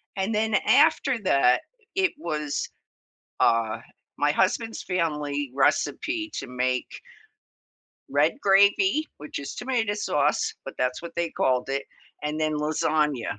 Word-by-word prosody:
And 195 +3 -1
then 220 0 +1
after 285 -4 +4
that, 135 -8 +4 0.3
it 385 -2 +2
was, 150 -3 -3 0.7
uh, 115 -1 +2 0.4
my 145 0 +2
husband's 220 +7 0
family 150 -6 -2
recipe 150 - 0
to - - -4
make 125 0 -1 1.2
red 145 +4 +3
gravy, 205 - +4
which 150 0 -7
is 140 - -6
tomato 240 -5 -1
sauce, 150 -8 0
but 135 - -7
that's 125 0 0
what 170 0 -9
they 170 -1 -1
called 130 0 0
it, 140 +1 -2 0.4
and 150 +1 -2
then 155 0 +1
lasagna, 150 -5 0
155 Hz, 125 wpm, -25 LUFS, 140-205 Hz, 1.2 s, after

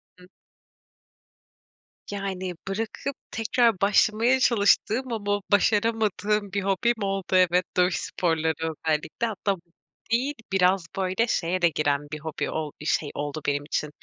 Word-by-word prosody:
Hıh. 180 0 -17 1.8
Yani, 190 -2 -3
bırakıp 225 +7 -3 0.2
tekrar 225 -3 +2
başlamaya 220 +5 +3
çalıştığım 235 +2 +2
ama 205 -1 -1
başaramadığım 210 -1 +2
bir 200 -1 -1
hobim 200 +5 +1
oldu 195 -1 -1
evet. 180 0 +4
Dövüş 180 0 +3
sporları 160 -2 0
özellikle. 160 +6 -1
Hatta 205 -1 -1
hobi 190 -4 -4 0.5
değil. 260 +5 +1 0.2
Biraz, 185 -1 +3
böyle, 190 +5 +1
şeye 180 -3 0
de 170 - +5
giren 145 -2 0
bir 155 - -4
hobi 155 0 -4
ol 155 -2 -3
bir - - -8
şey 150 -1 0
oldu 145 +1 -4
benim 145 0 0
için. 150 0 -2
195 Hz, 135 wpm, -25 LUFS, 165-215 Hz, 1.8 s, de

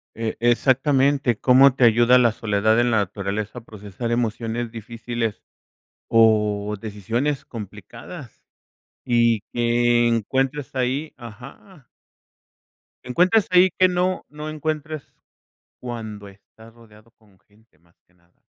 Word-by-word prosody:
E 115 0 -4
exactamente, 130 +1 +2
¿cómo 130 +1 +5
te 130 - +1
ayuda 120 +2 +5
la 120 -2 +4
soledad 110 0 +1
en 120 0 +2
la 110 - +2
naturaleza 100 +3 -3
a - - -19
procesar 105 +2 -7
emociones 115 0 -2
difíciles 115 0 -5 0.7
o 105 -2 +2
decisiones 115 +7 -3
complicadas? 105 -5 -10 0.6
Y 115 -2 +2
que 120 0 +2
encuentres 130 +5 -1
ahí 130 +5 -2
Ajá. 125 - -13 1.2
Encuentras 180 - +2
ahí 180 +1 +6
que 185 - +5
no 180 +1 -1
no 150 +1 -7
encuentres 155 -1 -4 0.8
cuando 110 -4 -7
estás 110 +3 -19
rodeado 115 -1 -20
con 105 -4 -28
gente, 105 -3 -30
más 85 +2 -32
que 90 - -34
nada. 90 -1 -35
120 Hz, 115 wpm, -22 LUFS, 110-130 Hz, 1.2 s, ahí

